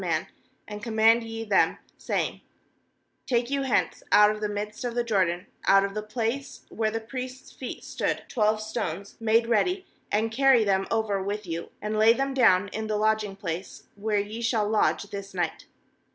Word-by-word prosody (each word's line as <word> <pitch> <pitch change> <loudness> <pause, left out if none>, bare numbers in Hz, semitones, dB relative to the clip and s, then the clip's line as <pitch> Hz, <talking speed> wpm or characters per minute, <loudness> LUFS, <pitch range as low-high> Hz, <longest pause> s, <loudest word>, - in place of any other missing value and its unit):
Ti, - - -4 0.6
3and 210 0 -7
command 225 +1 +4
ye 225 0 -5
them, 205 -3 +3 0.2
saying: - - -2 0.9
Take 240 0 +1
you 280 0 +1
hence 265 -3 0
out 210 0 +7
of 215 0 -6
the 210 - -1
midst 210 +2 -4
of 240 -1 -3
the 240 - +1
Jordan, 185 -5 +1 0.2
out 195 0 +6
of 200 - -5
the 215 - -2
place 230 +5 -3
where 220 -1 0
the 225 +1 -2
priests' 255 +3 -7
feet 255 - -7
stood, - - -2
twelve 215 -2 +1
stones 200 -4 -4
jmade 225 +1 +3
ready, 360 - +1 0.3
and 220 +2 +1
carry 265 -1 +5
them 195 -2 +1
over 220 -3 0
with 205 +2 -3
you, 170 -1 -5
and 215 0 -1
lay 220 +1 +7
them 270 +2 -1
down 205 -7 +4
in 220 +2 -4
the 215 -1 0
lodging 215 -2 +1
place, 175 -1 -5
where 210 +1 -1
ye 210 +3 -3
shall 225 -3 +1
lodge 215 -1 +2
this 200 -1 -8
night.' 175 -3 -2
215 Hz, 180 wpm, -26 LUFS, 205-230 Hz, 0.9 s, out